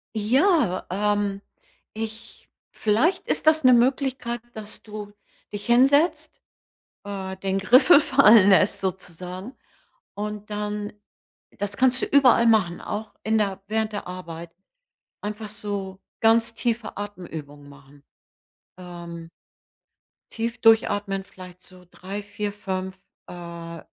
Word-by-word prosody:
Ja, 250 - +2
ähm, 205 +1 -1 0.5
ich 220 +1 -7 0.4
Vielleicht 225 - +1
ist - - -2
das 315 0 +5
'ne 255 - +7
Möglichkeit, 250 -1 +1
dass 215 -1 -7
du 210 -1 -9 0.4
dich 205 0 -6
hinsetzt, 275 +7 +3 0.6
äh, 190 -2 -6
den 190 0 -2
Griffel 255 - +6
fallen 230 -8 +6
lässt 195 +1 +3
sozusagen 185 +3 -6 0.6
und 210 0 -5
dann 210 0 -4 0.7
das 205 0 -4
kannst 260 0 +4
du - - +1
überall 255 -4 +5
machen, 200 -7 +2
auch 215 +1 -6
in 220 0 +1
der 195 -2 -1
während 220 0 -1
der 205 - -5
Arbeit, 170 -2 -8 0.7
einfach 210 +1 -5
so 200 -2 -5 0.2
ganz 230 0 +3
tiefe 230 -2 -3
Atemübungen 160 -8 -8
machen. 140 0 -18 0.7
Ähm. 170 -2 -9 1.0
Tief 230 +1 -3
durchatmen 205 -3 +3
vielleicht 180 -1 -14
so 185 -1 -17
3, 195 +3 -7
4, 205 0 -4
5, 190 -2 -5 0.3
äh, 170 -1 -8
205 Hz, 115 wpm, -24 LUFS, 185-225 Hz, 1.0 s, ne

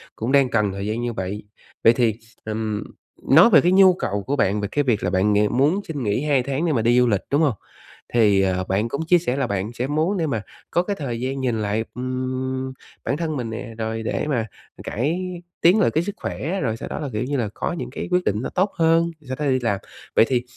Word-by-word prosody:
cũng 115 +4 -2
đang 140 -2 +4
cần 105 -4 +1
thời 100 +1 -5
gian 110 +2 -2
như 120 -1 -2
vậy. 100 +1 -4 0.4
Vậy 115 - +7
thì, 115 -3 +2 0.3
ừm, 110 -1 -2 0.5
nói 165 +11 +8
về - - +7
cái 175 - +3
nhu 190 -1 +7
cầu 100 - -3
của 140 - -1
bạn 105 -4 +1
về 100 - -1
cái 145 - +1
việc 120 -6 0
là - - +1
bạn 100 +3 +2
ng 105 +3 +2
muốn 150 +9 +3
xin 145 -5 -4
nghỉ 105 +6 0
2 140 -4 +2
tháng 140 +5 -1
để 160 - +1
mà 115 - +1
đi 120 +2 +4
du 125 - +4
lịch, 100 -5 +1
đúng 145 +3 +3
hông? 145 -6 +3 0.6
Thì, 105 -5 +4
ờ, 95 -1 +1
bạn 100 +5 -1
cũng 150 +6 -3
chia 175 +1 +5
sẻ 150 -7 -1
là 135 - 0
bạn 100 +3 -3
sẽ 125 +2 -2
muốn 160 +7 0
để 165 - 0
mà 115 -7 -1 0.3
có 175 - +2
cái 200 +2 -2
thời 120 -5 -3
gian 130 +2 -3
nhìn 115 -4 0
lại, 105 +2 0
ưm, 130 +1 -3 0.3
bản 140 - -1
thân 160 -3 -2
mình 120 -3 -3
nè, 115 +1 -6
rồi 110 0 -3
để - - -2
mà 120 -7 0 0.4
cải 145 - -1 0.4
tiến 180 +6 +5
lại - - +3
cái 160 - +1
sức 205 +2 -5
khỏe, 175 +8 -3
rồi 110 -1 -1
sau - - -7
đó - - -4
là, 145 - -4
kiểu 105 +3 -1
như 140 +2 -2
là, 110 -4 -1
có - - -3
những 125 -8 -5
cái 125 - -5
quyết 180 0 +2
định 105 +3 0
nó - - -3
tốt 190 +2 0
hơn, 165 +1 +3 0.2
sau 130 - -3
đó 150 - -1
đi 130 -2 +2
làm. 100 -5 0 0.4
Vậy - - +6
thì, 125 -2 +1
125 Hz, 255 wpm, -22 LUFS, 110-150 Hz, 0.6 s, nói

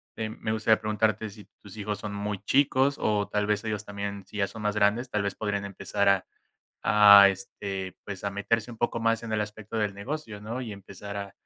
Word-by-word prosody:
em, 110 0 -4
me 110 - -1
gustaría 110 0 +3
preguntarte 110 0 0
si 105 0 -13 0.2
tus 100 +1 -12
hijos 105 0 -3
son 105 -1 -5
muy 100 0 -3
chicos, 135 +3 +3
o 105 -2 +1
tal 105 0 0
vez 105 +1 0
ellos 105 -1 -3
también, 100 -1 -5
si 105 - -10
ya 100 - +1
son 110 0 -9
más 105 0 +1
grandes, 105 +5 +2
tal 105 - +1
vez 100 -1 -2
podrían 100 -1 -2
empezar 100 +1 -1
a 100 -1 +3 0.6
a 100 -1 +9
este, 95 -1 -5
pues, 100 -1 -7
a 100 - 0
meterse 100 +3 0
un - - -10
poco 120 0 0
más 115 0 +1
en 115 -1 -5
el 110 - +1
aspecto 105 +1 -5
del 105 -2 0
negocio, 110 0 -5
¿no? 115 +4 -5
Y 115 -4 -5
empezar 100 +1 -9
a 100 -1 -5
105 Hz, 220 wpm, -27 LUFS, 100-110 Hz, 0.6 s, a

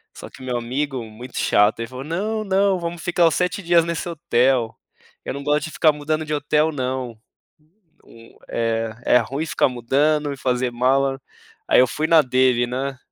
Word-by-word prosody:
Só - - -10
que - - -15
meu 125 -1 -3
amigo, 130 +1 -3
muito 115 +3 -10
chato, 105 +2 +3
ele 115 - -3
falou: 130 +1 -8
"Não, 210 +7 -2
não, 195 -1 +2
vamos 170 -1 -5
ficar 175 -1 +3
os 160 - +1
7 180 +2 -1
dias 170 -2 +4
nesse 170 +1 -3
hotel, 130 -7 +1 0.5
eu - - -3
não 140 +1 -6
gosto 150 +3 +1
de 160 - -8
ficar 155 - +4
mudando 155 +1 -2
de 155 - -4
hotel 150 +2 +1
não, 130 -4 -4 0.9
hum, 115 0 -17
eh, 115 -1 -1 0.2
é 125 - +6
ruim 135 +7 -3
ficar 150 - +2
mudando 145 +5 0
e - - -6
fazer 125 -1 -1
mala". 135 +2 +1 0.5
Aí - - +6
eu 130 - +5
fui 155 +5 -2
na 165 -1 +6
dele, 130 -2 +2
né. 135 +2 -4
135 Hz, 190 wpm, -21 LUFS, 125-160 Hz, 0.9 s, é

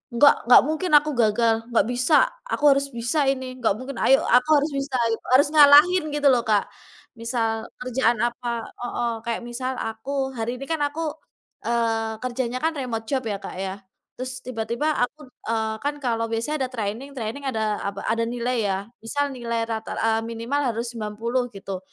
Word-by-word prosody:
"Nggak 285 +4 +7
nggak 245 - +9
mungkin 315 +5 -2
aku 300 +1 +5
gagal. 225 0 +3 0.2
Nggak 225 - +4
bisa! 250 +5 +2 0.3
Aku 295 - -3
harus 275 0 +2
bisa 240 +5 0
ini, 260 -1 -2
nggak 220 -4 +2
mungkin, 255 +3 -7
ayo, 270 - +5
aku 250 +5 +4
harus 300 +1 -1
bisa!" 275 -1 -3 0.2
Gitu. 225 - -3
Harus 280 +3 +6
ngalahin, 305 +4 +7
gitu 290 -1 +2
loh, 245 -2 +3
Kak. 210 -2 +1 0.5
Misal 230 -1 -2 0.2
kerjaan 240 -2 +1
apa 240 -1 -2
heeh, 240 -1 -3
kayak 235 +1 -2
misal 250 +2 -4
aku 265 +5 -3
hari 240 +3 -2
ini - - -4
kan 320 -2 0
aku, 310 +1 -3 0.5
eee, 225 -2 0
kerjanya 250 0 -2
kan 325 - +2
remote 225 -4 -4
job, 265 -3 0
ya 205 -2 -2
Kak - - -7
ya, 190 +1 -4 0.4
terus 255 -1 -5
tiba-tiba 240 +5 -2
aku 300 +4 -4 0.3
eee, 220 -1 0
kan 290 +1 -1
kalau 230 -2 0
biasanya 260 +4 -1
ada - - -18
training, 230 +5 -4
training 235 +4 -5
ada 220 -4 -1
apa, 200 0 -5
ada 230 0 +1
nilai 245 0 -1
ya. 190 -1 0 0.3
Misal 285 +4 -1
nilai 235 -2 -2
rata, 220 -1 -4
eee, 225 0 +1
minimal 230 +5 -2 0.2
harus 235 +1 -3
90 230 +3 -2
gitu, 195 -1 -6
240 Hz, 180 wpm, -24 LUFS, 225-275 Hz, 0.5 s, nggak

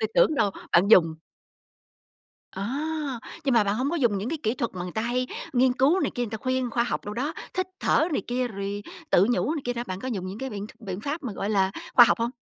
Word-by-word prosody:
Tui 220 - 0
tưởng 310 - +5
đâu 215 -6 +2 0.2
bạn 180 +4 +5
dùng 165 -7 +6 1.4
À! 275 +5 -3 0.2
Nhưng 270 -3 +2
mà 225 -3 +5
bạn 200 +1 +1
hổng 260 +4 0
có 345 - -1
dùng 235 -9 +2
những 210 +5 -3
cái 320 - -2
kỹ 220 - +1
thuật 235 -3 -2
mà 180 - -4
người 180 0 -6
ta 220 - -1
hay 250 +2 0 0.3
nghiên 255 0 +4
cứu 275 +9 +3
này - - 0
kia, 245 - -1
người 235 - -3
ta 220 - -3
khuyên 255 0 -1
khoa 235 - +1
học - - -3
đồ 205 - -5
đó, 275 +7 -2 0.2
thít 370 0 0
thở 320 - +3
này - - 0
kia, 245 0 -1
rồi 200 0 -4 0.3
tự 185 - +5
nhủ 290 +5 +1
này 300 - -4
kia 245 - 0
đó, 240 0 -3
bạn 185 0 -5
có 260 - -4
dùng 195 -7 -3
những 195 +3 -6
cái 265 0 -4
biện 205 -1 -5
biện 195 -4 -6
pháp 290 +8 -3
mà, 245 -6 -4
gọi 200 +1 -3
là, 195 -2 +2 0.2
khoa 240 - +10
học - - +2
hông? 230 +1 0
235 Hz, 265 wpm, -26 LUFS, 200-265 Hz, 1.4 s, khoa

